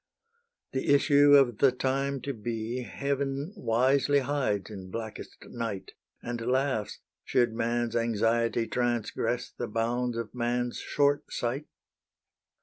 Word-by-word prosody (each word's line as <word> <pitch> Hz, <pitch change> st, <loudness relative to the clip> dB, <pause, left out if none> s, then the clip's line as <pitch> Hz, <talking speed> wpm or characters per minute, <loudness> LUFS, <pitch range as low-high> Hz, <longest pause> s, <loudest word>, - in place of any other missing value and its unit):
The 130 Hz, +1 st, 0 dB
issue 145 Hz, 0 st, +6 dB
of 125 Hz, -6 st, +4 dB
the 135 Hz, -, +6 dB
time 135 Hz, +1 st, -1 dB
to 140 Hz, +3 st, -3 dB
be 115 Hz, +2 st, -3 dB
Heaven 140 Hz, -, -2 dB
wisely 135 Hz, -, +2 dB
hides 130 Hz, -8 st, -1 dB
in 95 Hz, -3 st, -8 dB
blackest 110 Hz, +2 st, -7 dB
night, 115 Hz, -5 st, -5 dB, 0.3 s
And 120 Hz, -1 st, -4 dB
laughs, 125 Hz, -4 st, 0 dB, 0.3 s
should 120 Hz, -3 st, +2 dB
man's 120 Hz, 0 st, -1 dB
anxiety 115 Hz, 0 st, +1 dB
Transgress 120 Hz, -2 st, -1 dB
the -, -, -5 dB
bounds 120 Hz, +2 st, -1 dB
of 115 Hz, -2 st, -5 dB
man's 120 Hz, 0 st, -1 dB
short 145 Hz, 0 st, +1 dB
sight. 130 Hz, +5 st, -2 dB
120 Hz, 120 wpm, -28 LUFS, 115-135 Hz, 0.3 s, issue